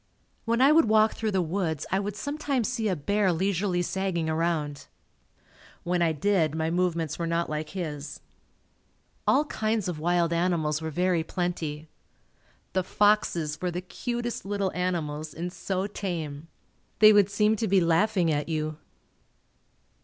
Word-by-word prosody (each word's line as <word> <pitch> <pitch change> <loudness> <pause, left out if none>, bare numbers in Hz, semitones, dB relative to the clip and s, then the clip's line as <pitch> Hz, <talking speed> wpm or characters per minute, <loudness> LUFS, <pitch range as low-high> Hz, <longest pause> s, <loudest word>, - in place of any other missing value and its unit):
When 230 +2 +1
I 275 +3 +7
would 320 -2 +6
walk 215 0 +4
through 220 - -2
the 190 -3 +1
woods 165 -3 -2
I 190 - +2
would 200 0 -3
sometimes 285 -1 -2
see 235 -3 -1
a 190 - +1
bear 200 +5 +1
leisurely 180 +1 0
sagging 175 -3 -1
around. 155 -3 -1 1.0
When 175 0 0
I 165 -1 +3
did, 160 -1 +1
my 160 0 -1
movements 170 -3 -1
were 170 - -1
not 170 -1 -1
like 155 0 -3
his. 150 -5 -5 1.1
All 290 +3 +4
kinds 220 -7 -1
of 170 -4 -3
wild 170 +1 +1
animals 165 -3 0
were 160 - -3
very 175 +1 +1
plenty. 160 -3 -3 0.9
The 185 - +1
foxes 175 -7 +1
were 180 - 0
the 175 +1 -4
cutest 240 +5 -4
little 200 -1 -1
animals 155 -4 -3
and 175 +2 -4
so 190 0 -2
tame. 165 -7 -5 0.5
They 215 0 +8
would 205 -1 +5
seem 210 +2 +2
to 220 - -1
be 195 0 +4
laughing 170 +1 +2
at 145 +2 -2
you. 155 -1 -2
180 Hz, 155 wpm, -27 LUFS, 160-205 Hz, 1.1 s, They